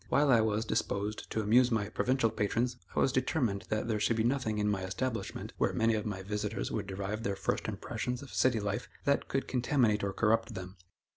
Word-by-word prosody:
While 145 -1 +4
I 115 -3 +6
was 110 0 0
disposed 105 0 -2
to 110 - -1
amuse 120 +4 +5
my 110 -4 0
provincial 125 -2 +1
patrons, 115 +4 0 0.2
I - - +2
was 135 - +3
determined 130 - 0
that 110 +1 -1
there 110 -2 0
should 115 +2 +2
be 110 - +2
nothing 120 -3 0
in 105 0 +1
my 100 -2 0
establishment, 110 +6 -3
where - - +2
many 115 0 +3
of 110 0 -1
my 95 -2 -4
visitors 105 +1 -3
would 105 -3 -2
derive 100 +3 -3
their 100 -3 -1
first - - -1
impressions 125 +1 -3
of 140 - -11
city 125 -3 +3
life, 100 -1 -3 0.2
that 140 0 +2
could 135 - -1
contaminate 120 -4 +2
or 100 - 0
corrupt 115 +2 +1
them. 95 +1 -7
110 Hz, 210 wpm, -31 LUFS, 105-125 Hz, 0.2 s, I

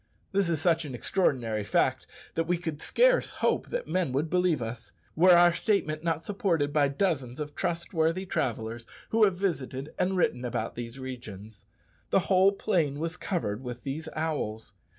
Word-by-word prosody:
This 195 -3 +1
is 165 -3 0
such 165 +1 +2
an 140 -5 -6
extraordinary 120 - 0
fact - - +1 0.3
that 165 0 -1
we 175 0 +2
could 160 -3 -5
scarce - - +3
hope - - 0
that - - -3
men 180 -7 0
would 150 +4 -1
believe 180 -4 +2
us, 115 0 -6 0.2
were 180 +2 +7
our 175 0 +6
statement 170 -5 0
not 165 -2 -1
supported 170 -8 0
by 145 -2 +4
dozens 140 -5 -1
of 150 -1 -5
trustworthy 170 +1 -1
travellers 115 -7 -3 0.2
who 225 -1 +5
have 195 -3 +1
visited 140 -6 -3
and 190 +1 +1
written 125 -8 +1
about 120 -2 -2
these 120 +1 -7
regions. 110 -6 -9 0.4
The 195 - +3
whole 190 +1 +4
plain 170 -9 0
was 165 +2 -3
covered 130 - -2
with 125 -1 -7
these 155 +4 -4
owls. 145 -9 -3
155 Hz, 170 wpm, -28 LUFS, 125-180 Hz, 0.4 s, were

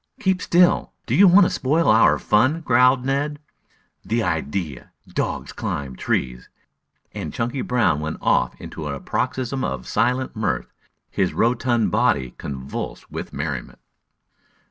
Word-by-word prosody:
"Keep 190 -2 +1
still! 175 0 +3
Do - - -2
you 200 +2 +7
want 190 +3 +7
to - - +1
spoil 155 +6 +1
our 110 -9 +5
fun?" 130 - +2
growled 125 -2 +3
Ned. 145 +2 -1 0.7
"The 115 +2 -1
idea! 80 -3 -3 0.2
Dogs - - -3
climb 65 -3 -4
trees!" 60 0 -2 0.6
And - - -5
Chunky 120 +3 -2
Brown 120 -12 +1
went 80 +1 -4
off - - +1
into 75 - -7
a 70 -1 -4
paroxysm 130 - -2
of 65 -2 -3
silent 125 +2 0
mirth, 110 - -2 0.4
his 95 -2 0
rotund 120 -1 +1
body 100 - +1
convulsed 65 -1 -6
with - - -6
merriment. 70 -3 -5
115 Hz, 135 wpm, -22 LUFS, -, 0.7 s, you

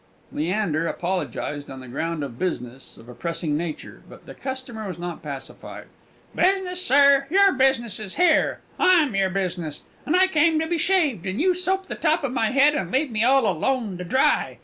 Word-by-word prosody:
Leander 170 -1 -1
apologized 150 -5 -3
on 135 - -8
the 130 - -11
ground 160 +5 -3
of 125 -4 -7
business 130 -8 -4
of 115 - -15
a 125 - -10
pressing 155 +4 -3
nature, 160 0 -5
but - - -14
the - - -10
customer 260 -5 -6
was 180 -3 -6
not 175 -1 -6
pacified. 140 -3 -8 0.5
"Business, 370 -1 +1
sir! 280 -1 +5
your 395 +3 +5
business 260 - +1
is 210 -3 -7
here: 320 -4 +2 0.2
I'm 325 - +4
your 195 -1 +2
business! 180 -5 -3 0.2
And 310 - +2
I 370 +1 +6
come 320 -3 +2
to 320 - 0
be 335 0 -1
shaved, 305 - +1
and 190 +3 -3
you 365 +4 +3
soap 375 +2 -1
the - - -6
top 315 0 0
of 275 - -1
my 230 -4 0
head, 275 +4 +4
and 305 - -2
leave 265 +1 +1
me 215 0 0
all 265 0 +4
alone 205 +1 -1
to - - -4
dry! 260 +10 +1
230 Hz, 195 wpm, -23 LUFS, -, 0.5 s, I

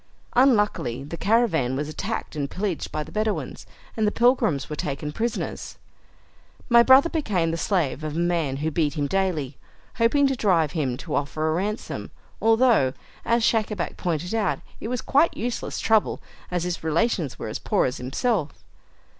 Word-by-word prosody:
Unluckily, 210 - +2
the 150 +4 -6
caravan 170 - +2
was 145 +2 -2
attacked 195 +6 -4
and 140 -2 -2
pillaged 190 -4 -3
by 155 - -2
the - - -13
Bedouins, 215 0 -2 0.3
and 220 -2 +1
the - - +2
pilgrims 235 - +2
were 150 - -5
taken 150 +1 -4
prisoners. 230 +8 -3 0.9
My 235 -1 +7
brother 265 +5 +7
became 205 - 0
the - - -1
slave 165 -6 0
of 155 -1 -4
a - - -1
man 170 -6 0
who 160 - 0
beat 155 -1 0
him 145 -2 0
daily, 155 -6 -1 0.4
hoping 255 +5 +3
to 270 -1 +2
drive 175 - +2
him 135 -7 -1
to 155 +2 -7
offer 155 +2 -1
a - - +1
ransom, 205 +6 -3 0.3
although, 225 - +4 0.3
as 235 0 +1
Schacabac 215 -5 0
pointed 175 +2 -2
out, 215 -5 +1 0.2
it - - -5
was 245 0 -3
quite 290 +5 +3
useless 240 +1 -3
trouble, 220 -2 +2 0.3
as 180 -1 -1
his 175 -2 -3
relations 160 - 0
were - - -5
as 110 - -4
poor - - +1
as 125 - -2
himself. 150 - -2
180 Hz, 170 wpm, -24 LUFS, 150-225 Hz, 0.9 s, My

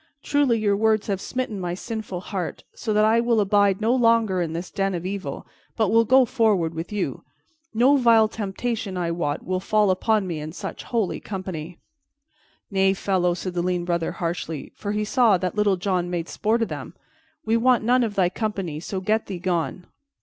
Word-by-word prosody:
Truly, 285 -5 +2
your 205 -2 +2
words 220 0 +2
have 195 -2 -2
smitten 250 -6 -3
my 175 -1 -3
sinful 215 -3 -5
heart, 185 -3 -5
so 220 - -4
that 210 0 +4
I 225 +2 +4
will 235 -1 +2
abide 200 -1 +3
no 225 +3 +2
longer 230 -6 +3
in 165 -2 -2
this 170 +2 -5
den 195 -2 -1
of 175 0 -5
evil, 195 0 -5 0.3
but 220 -4 +1
will 230 +1 +4
go 260 +3 +5
forward 215 -10 +1
with 165 +4 -6
you. 210 -1 -3 0.5
No 255 +6 +4
vile 230 -4 +5
temptation, 210 -1 -3
I 170 -2 -1
wot, 155 -4 -2
will 185 0 -1
fall 210 +1 +2
upon 210 +2 +1
me 170 -4 -4
in 155 +1 -6
such - - -7
holy 225 -6 -1
company." 180 -4 -6 0.9
"Nay, 195 0 +3
fellow," 180 -2 +1
said 185 0 -5
the 175 - -1
lean 180 -1 -1
Brother 170 -2 -1
harshly, 165 -4 -4
for 205 - -4
he 210 0 -1
saw 225 -3 +4
that 180 0 -2
Little 205 -2 +2
John 180 -1 -1
made 175 -1 -3
sport 225 +2 0
of - - -2
them, - - -7 0.5
"we 220 +1 +2
want 240 0 +3
none 250 +2 +3
of 215 -3 -2
thy 185 -2 +3
company, 195 -7 -3
so 190 +3 -4
get 215 +3 0
thee 190 - -4
gone." 175 0 -2
200 Hz, 195 wpm, -24 LUFS, 180-220 Hz, 0.9 s, go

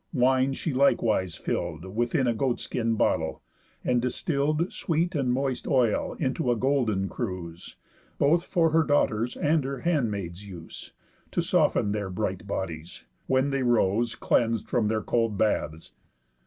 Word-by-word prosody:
Wine 130 0 +3
she 155 - -3
likewise 110 -9 +2
fill'd 85 -1 -3
Within 120 +3 +1
a 120 - +2
goat 120 +2 0
skin 115 -2 -1
bottle, - - 0 0.4
and 125 -1 +2
distill'd 150 +6 0
Sweet 170 +2 0
and 135 -5 0
moist 130 0 -1
oil 125 -7 +2
into 130 -3 0
a - - +2
golden 115 -6 +1
cruse, 90 -7 -6 0.4
Both 165 +5 +3
for 165 -4 +2
her 165 +1 +4
daughter's, 125 -6 +1
and 155 0 +2
her 135 0 -4
handmaid's, 105 - -1
use, 85 -3 -10 0.4
To - - -1
soften 100 - +2
their 105 -2 -2
bright 95 -1 -3
bodies, 85 -4 -5 0.2
when 130 +2 +2
they 135 -1 0
rose 120 -1 +2
Cleans'd 115 -2 +1
from 115 -3 +1
their 110 0 0
cold 115 -3 0
baths. 85 -6 -1
120 Hz, 145 wpm, -27 LUFS, 100-140 Hz, 0.4 s, her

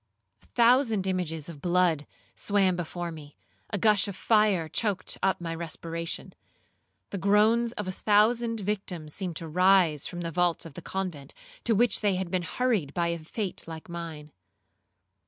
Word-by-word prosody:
A - - -25
thousand 235 -4 +3
images 170 -5 -2
of 160 -4 -10
blood 175 -4 +2 0.3
swam 195 -3 +2
before 175 0 -4
me,—a 155 +6 -9
gush 210 -1 +3
of 200 - -5
fire 210 -6 +3
choaked 200 +4 -1
up 195 - +2
my 165 -1 -4
respiration. 165 0 -5 0.8
The 200 - -3
groans 215 +4 +3
of - - -5
a - - -1
thousand 225 +3 +2
victims 185 -6 -3
seemed 185 -4 -4
to 165 - -5
rise 180 -3 +4
from 175 -1 -6
the 170 -1 -3
vaults 175 0 +1
of 165 - -9
the - - -8
convent, 175 -8 -5 0.3
to 230 - +3
which 230 0 +3
they 205 -2 +2
had 180 -1 -3
been 185 -1 +1
hurried 200 - -1
by 170 -1 +1
a 170 0 -2
fate 185 +5 -4
like 160 -1 -8
mine. 165 -3 -7
180 Hz, 160 wpm, -28 LUFS, 165-205 Hz, 0.8 s, rise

